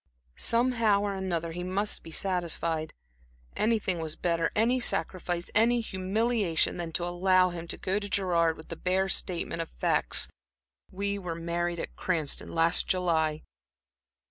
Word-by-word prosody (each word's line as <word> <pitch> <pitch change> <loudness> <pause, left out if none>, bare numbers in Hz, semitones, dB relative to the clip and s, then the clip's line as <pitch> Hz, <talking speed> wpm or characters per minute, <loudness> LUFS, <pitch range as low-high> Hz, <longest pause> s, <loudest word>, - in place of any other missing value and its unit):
Somehow 230 -4 +3
or 205 -1 -1
another, 175 -4 -2
he 175 +2 -5
must 195 +3 -1
be - - -11
satisfied. 165 -3 -1 0.6
Anything 210 -5 +1
was 160 -1 -4
better, 165 -2 0
any 235 +4 +3
sacrifice, 175 -4 -1
any 235 +2 +4
humiliation, 205 -3 0
than 170 -2 -4
to 175 - -1
allow 185 +1 +3
him 170 -1 -6
to - - -4
go 190 +2 -1
to 205 -1 -6
Gerard 170 -4 +2
with 160 - -13
that 165 - -8
bare 190 +1 +2
statement 170 -3 -1
of 165 - -5
facts, - - +2 0.6
"We 200 +1 -2
were 175 -3 -4
married 170 +1 -2
at - - -6
Cranston, 160 -6 -1
last 165 0 +2
July!" 160 -4 +1
180 Hz, 145 wpm, -29 LUFS, 165-200 Hz, 0.6 s, any